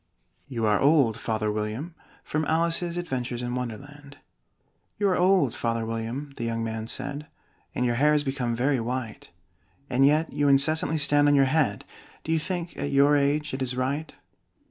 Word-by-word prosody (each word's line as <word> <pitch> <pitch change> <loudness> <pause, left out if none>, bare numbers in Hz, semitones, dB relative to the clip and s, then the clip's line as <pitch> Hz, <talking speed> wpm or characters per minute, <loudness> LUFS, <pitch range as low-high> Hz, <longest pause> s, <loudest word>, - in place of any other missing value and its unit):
YOU 120 -5 -2
ARE 105 -1 +3
OLD, 140 -6 +4
FATHER 110 -2 -2
WILLIAM 110 +10 -4 0.3
From 155 +1 -2
'Alice's 170 +2 +1
Adventures 125 -7 -3
in 120 0 -3
Wonderland' 140 +4 -7 0.8
"You 205 - +1
are 185 - +2
old, 180 - +3
Father 115 -1 -2
William," 115 +6 -5
the - - -4
young 115 0 -2
man 110 0 -4
said, 145 +5 -4 0.5
"And 125 - 0
your 120 - +1
hair 150 +1 +5
has 150 -1 +2
become 130 -4 -2
very 130 +2 +1
white; 120 -1 -5 0.6
And 130 +2 +3
yet 155 +3 +3
you 145 - +1
incessantly 155 +3 +3
stand 145 0 +4
on 145 - +4
your 135 -1 +5
head 135 -7 0 0.4
Do 160 - -4
you 160 - +2
think, 175 +1 -4
at 145 - -3
your 140 +1 +4
age, 145 +1 0
it 130 - -4
is 125 -1 -2
right?" 140 +5 -2
140 Hz, 175 wpm, -26 LUFS, 120-150 Hz, 0.8 s, hair